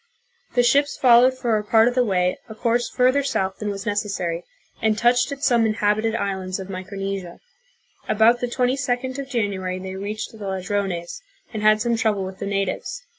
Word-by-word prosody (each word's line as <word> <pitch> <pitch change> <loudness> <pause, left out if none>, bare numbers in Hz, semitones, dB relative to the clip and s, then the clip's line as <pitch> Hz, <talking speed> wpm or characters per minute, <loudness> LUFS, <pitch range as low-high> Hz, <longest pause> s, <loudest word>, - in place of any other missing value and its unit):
The 245 - +4
ships 285 +4 +2
followed 255 +1 +5
for 235 -4 +1
a - - -5
part 220 +2 +4
of 245 - +1
the 250 0 +3
way 180 -4 0
a 220 - -8
course 240 +1 0
further 255 +2 +3
south 190 -8 -2
than 210 - -3
was 200 +1 -5
necessary, 200 -5 -2 0.4
and 220 -1 +2
touched 240 +4 +3
at 280 0 -6
some 240 -4 +4
inhabited 215 +1 +1
islands 190 -3 -2
of 190 0 -7
Micronesia. 195 -1 -5 0.7
About 225 +3 +4
the 245 - -1
22d 255 +1 -1
of 275 -1 -6
January 195 -7 -2
they 190 0 -6
reached 205 +3 -5
the 220 - -14
Ladrones 190 - -3 0.3
and 215 - -3
had 215 0 +4
some 235 0 +1
trouble 215 -3 0
with 190 0 -8
the - - -4
natives. 200 - -3
215 Hz, 180 wpm, -22 LUFS, 195-245 Hz, 0.7 s, followed